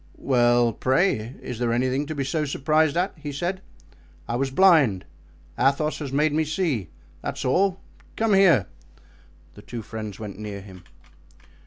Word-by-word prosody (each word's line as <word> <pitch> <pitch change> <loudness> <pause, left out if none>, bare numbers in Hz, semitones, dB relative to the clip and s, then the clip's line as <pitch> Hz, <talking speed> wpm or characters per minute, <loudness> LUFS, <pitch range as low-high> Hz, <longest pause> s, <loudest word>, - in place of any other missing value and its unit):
"Well, 120 -2 +3
pray, 130 - 0
is 120 -2 -6
there 120 -1 0
anything 130 +4 0
to 155 - -4
be 140 - -1
so 150 +3 -1
surprised 155 +2 +1
at?" 180 +2 0
he 150 -1 -6
said. 175 +6 -3 0.7
"I 120 - -2
was 135 +2 0
blind; 140 - +4 0.5
Athos 145 +3 +1
has 145 -4 -5
made 150 +2 +2
me 160 +1 +2
see, 155 - -1 0.3
that's - - -4
all; 190 +8 +2 0.4
come 225 -2 +1
here." 175 - +5 0.9
The 105 - -13
two 115 +1 -7
friends 110 -2 -7
went 105 -2 -7
near 105 -2 -6
him. 95 -2 -13
135 Hz, 155 wpm, -24 LUFS, 115-155 Hz, 0.9 s, here